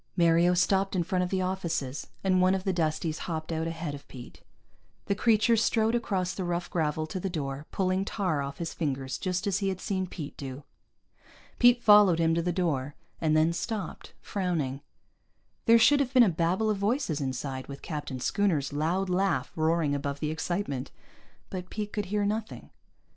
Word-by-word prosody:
Mario 170 +1 +4
stopped 195 +2 +2
in 175 - +2
front 180 +1 0
of 180 - -2
the 185 0 0
offices, 170 -7 -3 0.2
and 185 -1 +3
one 185 +1 +4
of 190 - -3
the 190 - 0
Dusties 160 -1 -1
hopped 160 0 -3
out 160 0 -1
ahead 165 -2 -4
of 145 0 -10
Pete. 125 -2 -11 0.6
The - - +1
creature 220 +2 +3
strode 225 0 +2
across 190 -6 -1
the 190 - -4
rough 175 0 -2
gravel 155 -2 0
to 175 +4 -5
the 195 - -2
door, 145 -3 -4
pulling 185 0 0
tar 185 -8 -1
off 140 0 -5
his 170 -1 -4
fingers 135 -4 -3
just 185 +1 -2
as 200 -1 +1
he 195 -1 0
had 190 -1 -3
seen 190 -1 -2
Pete 150 -5 -7
do. 135 0 -7 1.0
Pete 245 0 +5
followed 205 -5 +7
him 165 -1 +2
to 170 - +1
the 175 +1 0
door, 145 -6 -1 0.3
and 155 -1 +3
then 160 +2 +3
stopped, 195 +2 -5
frowning. 160 -9 -2 0.9
There 230 0 +8
should 285 +6 +5
have 270 -1 -1
been 250 - +9
a 220 - +4
babble 180 +6 +1
of 205 - -2
voices 200 - 0
inside, 130 0 -4
with 140 0 -9
Captain 145 -4 -5
Schooner's 155 -3 0
loud 170 +6 0
laugh 180 -7 0
roaring 160 -2 +1
above 140 0 -3
the 155 -1 -1
excitement. 155 -4 -3 0.6
But 180 -1 -5
Pete 210 -1 -5
could 210 -2 -2
hear 205 +2 0
nothing. 215 +1 -4
175 Hz, 185 wpm, -28 LUFS, 155-195 Hz, 1.0 s, been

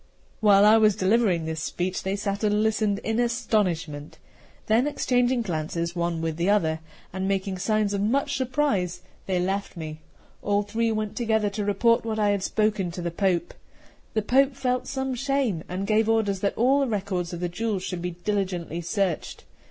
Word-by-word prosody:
While 205 -2 +6
I 215 +1 +7
was 215 -2 +4
delivering 190 -4 +2
this 160 -1 -3
speech, 180 +3 -2
they 190 +1 -2
sat 200 +1 -3
and 210 0 +2
listened 215 -2 +1
in 225 +1 -1
astonishment. 195 -11 -1 0.5
Then 230 +5 +3
exchanging 250 -3 +1
glances 170 -1 -3
one 170 -1 -1
with 160 -1 -2
the 170 +3 +1
other, 160 -6 +2 0.3
and 190 +1 -2
making 195 -1 -1
signs 215 +1 +1
of 200 - -1
much 245 +7 +1
surprise, 240 -10 0 0.2
they 185 -2 +1
left 195 +1 -2
me. 155 -1 -6 0.4
All 205 0 +1
three 225 +2 0
went 215 -1 -2
together 220 -3 +1
to 205 +1 -3
report 205 +4 +2
what 220 -1 -3
I 210 -1 +2
had 200 -1 +1
spoken 210 -2 0
to 175 - -5
the 170 - -2
Pope. 180 -1 0 0.6
The 215 - +1
Pope 265 +4 +3
felt 255 -2 -1
some 265 -1 -2
shame, 255 - 0
and 185 +2 -3
gave 220 +1 +2
orders 210 -4 +1
that 200 +1 -1
all 260 +5 +4
the 275 - +1
records 190 -5 -2
of 175 - -5
the 175 - -1
jewels 195 +2 -2
should 180 -2 -4
be 180 - -2 0.2
diligently 185 -5 -1
searched. 175 0 -2
205 Hz, 185 wpm, -25 LUFS, 180-225 Hz, 0.6 s, I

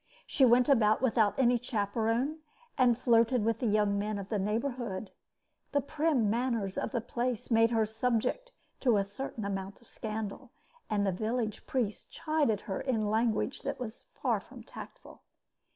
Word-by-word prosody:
She 275 - +1
went 245 +1 +5
about 225 -4 +4
without 225 -4 +3
any 245 -2 +4
chaperon, 230 +5 -1 0.4
and 250 -4 +4
flirted 235 -1 +3
with 225 0 +1
the 240 - 0
young 205 -1 +2
men 210 +1 -2
of 200 0 -6
the 210 - 0
neighborhood. 220 -1 -2 0.6
The 285 - +3
prim 290 -4 +1
manners 230 -3 0
of - - -2
the 240 -3 -1
place 245 0 -3
made 225 0 +5
her 225 -2 +2
subject 235 - -1 0.3
to 240 -5 +3
a 200 - +2
certain 205 +2 -6
amount 195 0 -4
of 235 - -22
scandal, 215 -2 -5 0.4
and 205 -1 +1
the 195 - +2
village 220 +3 -2
priest 230 -6 -2
chided 300 -10 0
her 190 - -4
in 220 -6 0
language 225 +3 0
that - - -4
was 235 -2 -7
far - - 0
from - - -13
tactful. - - -11
225 Hz, 165 wpm, -31 LUFS, 210-250 Hz, 0.6 s, went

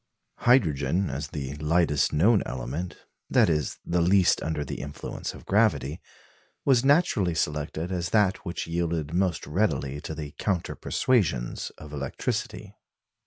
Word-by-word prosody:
Hydrogen, 95 - +2
as 70 +2 -4
the 70 -3 -5
lightest 75 -1 +2
known 100 +8 +4
element 65 +9 -5 0.2
that - - +4
is, 75 -3 -1
the 85 0 +1
least 90 +2 +4
under 75 -2 -2
the - - -5
influence 70 0 -6
of - - -13
gravity 95 - +1 0.6
was 130 -3 +4
naturally 135 - +3
selected 75 +3 -2
as 90 -1 -2
that 100 -2 +3
which 90 -3 -5
yielded 85 -2 -2
most 90 -1 0
readily 75 -5 -1
to 80 - -6
the 75 -2 -6
counter 95 -5 -1
persuasions 80 - 0
of 75 -1 -11
electricity. 70 -2 -3
85 Hz, 135 wpm, -27 LUFS, 75-95 Hz, 0.6 s, known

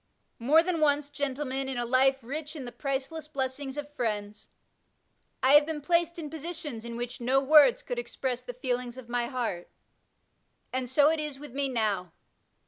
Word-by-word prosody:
More 295 +8 +5
than 350 -2 -1
once, 290 -1 +2
gentlemen, 270 -1 -2
in 265 - -3
a 240 - -1
life 265 +2 +3
rich 295 +5 -5
in 275 -4 -6
the 240 - -6
priceless 275 +4 -3
blessings 270 -1 -3
of 295 0 -6
friends, 210 -5 -3 0.9
I 260 - +5
have 295 0 +7
been 320 -2 -3
placed 340 +3 +1
in 320 -3 -5
positions 315 -6 -6
in 235 0 -6
which 245 +1 -5
no 255 +3 +3
words 300 - +6
could - - -3
express 260 - -3
the 250 - -7
feelings 250 -1 -2
of 250 -2 -10
my 240 0 0
heart, 235 -9 -3 1.0
and 255 -1 -1
so 290 +3 +5
it 320 - 0
is 300 -2 -4
with 290 -2 -10
me 275 0 0
now. 205 -8 -1
270 Hz, 180 wpm, -29 LUFS, 245-295 Hz, 1.0 s, have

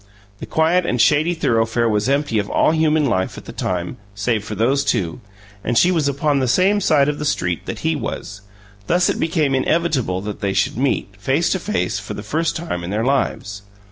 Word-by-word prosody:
The - - -7
quiet 165 +3 +2
and 125 -7 -1
shady 150 +8 +3
thoroughfare 115 -4 +1
was 105 +2 +1
empty 140 -5 +1
of 100 - -3
all - - +3
human 155 -1 +2
life, 95 -8 -1
at - - -10
the - - -8
time, 90 -1 -3 0.2
save 105 +1 -1
for 105 0 -6
those 130 +7 +2
two; 85 - -1 0.4
and 120 0 0
she 180 - +5
was 160 -5 +1
upon 140 +1 +1
the 130 - 0
same 190 +10 +3
side 145 -6 +3
of 150 0 -2
the - - -3
street 90 - -1
that 110 - -5
he 160 0 +2
was; 105 -7 -5 0.5
thus 175 +1 +3
it - - -1
became 160 -4 +1
inevitable 135 - +1
that 105 0 -6
they 100 -1 0
should 95 - +1
meet, 120 -5 -1
face 135 - +1
to 190 - +1
face, 95 - -1
for 105 - -7
the 105 - -7
first 160 +9 -1
time 160 - -4
in 85 - -5
their 110 +4 -1
lives. 105 -7 -1
135 Hz, 210 wpm, -20 LUFS, 105-155 Hz, 0.5 s, she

